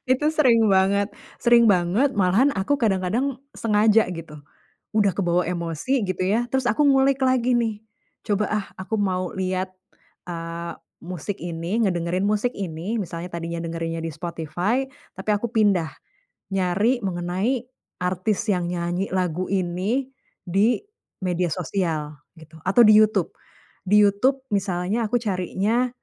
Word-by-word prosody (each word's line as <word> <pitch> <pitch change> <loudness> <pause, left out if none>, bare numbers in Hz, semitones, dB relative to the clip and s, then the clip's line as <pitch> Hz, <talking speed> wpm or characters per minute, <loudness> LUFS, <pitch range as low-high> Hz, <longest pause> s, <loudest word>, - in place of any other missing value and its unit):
itu 260 +4 +3
sering 235 -8 +4
banget 195 +1 +3 0.3
sering 235 0 +5
banget, 205 +7 +3
malahan 205 +8 +3
aku 200 +8 0
kadang-kadang 225 +4 0 0.2
sengaja 215 0 +4
gitu. 165 -3 -8 0.6
Udah 205 -3 +3
kebawa 175 -2 +1
emosi 180 - -1
gitu 185 -1 -2
ya, 225 +5 +2
terus 265 -2 0
aku 240 +6 +2
ngulik 275 -1 +3
lagi 255 -1 +2
nih. 225 -3 -1 0.5
Coba, 210 0 +1
ah, 210 -2 -1
aku 190 +4 -3
mau 185 -2 -1
lihat, 185 0 -2 0.6
eee, 170 0 -5 0.3
musik 180 +3 -5
ini, 170 +5 -3
ngedengerin 180 0 0
musik 215 +4 +1
ini, 195 +3 -4
misalnya 175 -1 -6
tadinya 170 0 -4
dengerinnya 165 0 -4
di 165 - -3
Spotify, 175 - -2 0.3
tapi 190 +3 -3
aku 210 +3 0
pindah, 205 -7 +2 0.6
nyari 195 +7 +1
mengenai 190 +6 -1 0.4
artis 185 +4 0
yang 180 -2 -1
nyanyi 175 +2 -2
lagu 180 -1 -1
ini, 195 +8 -1 0.4
di 200 +7 +3 0.5
media 180 -1 0
sosial 165 -3 -2 0.2
gitu, 160 0 -15
atau 190 +8 +4
di 215 - +7
YouTube. 215 -5 +3 0.6
Di 205 - +5
YouTube 260 +7 +2
misalnya 195 +3 0
aku 245 - +1
carinya, 205 +4 0
195 Hz, 135 wpm, -23 LUFS, 175-225 Hz, 0.6 s, di